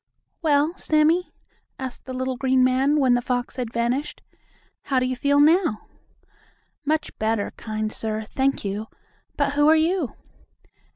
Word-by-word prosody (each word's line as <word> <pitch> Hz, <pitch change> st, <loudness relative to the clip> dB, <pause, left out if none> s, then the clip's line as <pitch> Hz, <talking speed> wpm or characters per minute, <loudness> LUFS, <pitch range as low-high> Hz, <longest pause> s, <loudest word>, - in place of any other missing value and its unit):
"Well, 305 Hz, +1 st, +2 dB
Sammie?" 315 Hz, +4 st, +2 dB, 0.5 s
asked 260 Hz, -3 st, -6 dB
the 260 Hz, -, -6 dB
little 260 Hz, 0 st, -2 dB
green 260 Hz, 0 st, +2 dB
man, 265 Hz, +4 st, +3 dB
when 260 Hz, -3 st, +4 dB
the 245 Hz, -, +2 dB
fox 245 Hz, 0 st, -3 dB
had 245 Hz, -3 st, -3 dB
vanished, 240 Hz, +5 st, -2 dB, 0.6 s
"How 270 Hz, -, 0 dB
do 255 Hz, -, +2 dB
you 255 Hz, 0 st, -1 dB
feel 285 Hz, +3 st, +2 dB
now?" 315 Hz, -, +3 dB, 1.0 s
"Much 310 Hz, +1 st, -1 dB
better, 220 Hz, -1 st, 0 dB
kind 215 Hz, -1 st, -4 dB
sir. 220 Hz, 0 st, -3 dB
Thank 265 Hz, +2 st, -1 dB
you. 205 Hz, +2 st, -3 dB, 0.5 s
But 285 Hz, -1 st, +1 dB
who 290 Hz, +1 st, +4 dB
are 320 Hz, -, +7 dB
you?" 320 Hz, -2 st, 0 dB
260 Hz, 150 wpm, -23 LUFS, 240-295 Hz, 1.0 s, are